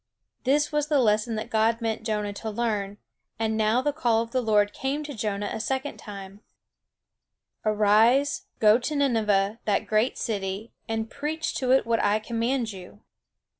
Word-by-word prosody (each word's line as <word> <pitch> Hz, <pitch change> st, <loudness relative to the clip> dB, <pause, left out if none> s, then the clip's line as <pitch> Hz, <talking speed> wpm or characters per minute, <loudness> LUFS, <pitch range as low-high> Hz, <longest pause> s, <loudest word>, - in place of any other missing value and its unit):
This 290 Hz, +3 st, +2 dB
was 295 Hz, -1 st, 0 dB
the 300 Hz, -1 st, +2 dB
lesson 220 Hz, -2 st, +2 dB
that 220 Hz, +2 st, -5 dB
God 225 Hz, +1 st, +2 dB
meant 225 Hz, -2 st, -2 dB
Jonah 210 Hz, -2 st, -2 dB
to 220 Hz, +2 st, -5 dB
learn; 210 Hz, -3 st, -2 dB, 0.4 s
and 220 Hz, 0 st, 0 dB
now 220 Hz, +3 st, +2 dB
the 290 Hz, -, 0 dB
call 235 Hz, -7 st, +2 dB
of 230 Hz, -, -12 dB
the 255 Hz, -, +1 dB
Lord 210 Hz, -3 st, +2 dB
came 280 Hz, +3 st, -2 dB
to 295 Hz, -1 st, -6 dB
Jonah 205 Hz, -3 st, -3 dB
a -, -, -4 dB
second 265 Hz, +5 st, -2 dB
time: 200 Hz, -1 st, -10 dB, 1.2 s
"Arise, 215 Hz, +6 st, +3 dB
go 215 Hz, +1 st, +5 dB
to 300 Hz, +5 st, -3 dB
Nineveh, 220 Hz, -6 st, +1 dB
that 205 Hz, -2 st, +1 dB
great 215 Hz, +4 st, +1 dB
city, 200 Hz, 0 st, -3 dB, 0.2 s
and 225 Hz, 0 st, -2 dB
preach 315 Hz, +2 st, -3 dB
to 255 Hz, -, -2 dB
it 265 Hz, -, +4 dB
what 230 Hz, -1 st, +1 dB
I 205 Hz, +1 st, +3 dB
command 230 Hz, +2 st, -1 dB
you." 190 Hz, +2 st, -12 dB
225 Hz, 170 wpm, -26 LUFS, 210-255 Hz, 1.2 s, go